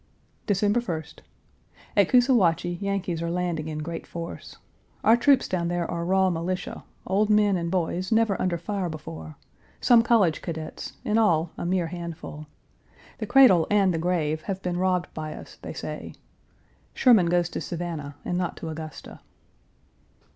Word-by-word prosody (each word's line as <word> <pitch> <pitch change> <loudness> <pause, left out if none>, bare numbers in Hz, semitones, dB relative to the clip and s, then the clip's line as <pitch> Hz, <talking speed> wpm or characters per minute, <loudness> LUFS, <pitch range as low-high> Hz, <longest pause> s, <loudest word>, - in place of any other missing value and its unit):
December 205 +3 +2
1st. 160 -7 -5 0.8
At - - +4
Coosawhatchie 190 - +3
Yankees 195 -4 -2
are 170 - -2
landing 170 -3 -2
in 155 -1 -4
great 165 +1 -6
force. 170 -1 -7 0.5
Our 225 - +6
troops 270 +2 +4
down 175 -2 -1
there 175 0 -1
are 170 0 -2
raw 190 +1 +3
militia, 175 +2 -3 0.2
old 205 +3 +1
men 210 -2 +4
and 170 -1 -2
boys 180 +1 -1
never 220 -2 +3
under 175 -2 0
fire 190 +1 -3
before; 80 - -8 0.4
some 240 -2 +6
college 220 -9 +3
cadets, 160 -2 -6
in 215 +1 +2
all 170 -6 +2
a - - -4
mere 180 -1 +1
handful. 165 -3 -7 0.7
The - - -3
cradle 210 - +6
and 200 -3 +3
the 165 - -1
grave 160 -3 0
have 190 0 -3
been 180 -1 -2
robbed 180 -1 0
by 155 -1 -5
us, - - -12
they - - -6
say. - - -6 0.8
Sherman 225 -9 +5
goes 175 0 +2
to - - -5
Savannah 165 -4 -5
and 175 - -1
not 180 - -2
to 165 - -6
Augusta. 155 -1 -8
175 Hz, 155 wpm, -26 LUFS, 165-200 Hz, 0.8 s, Our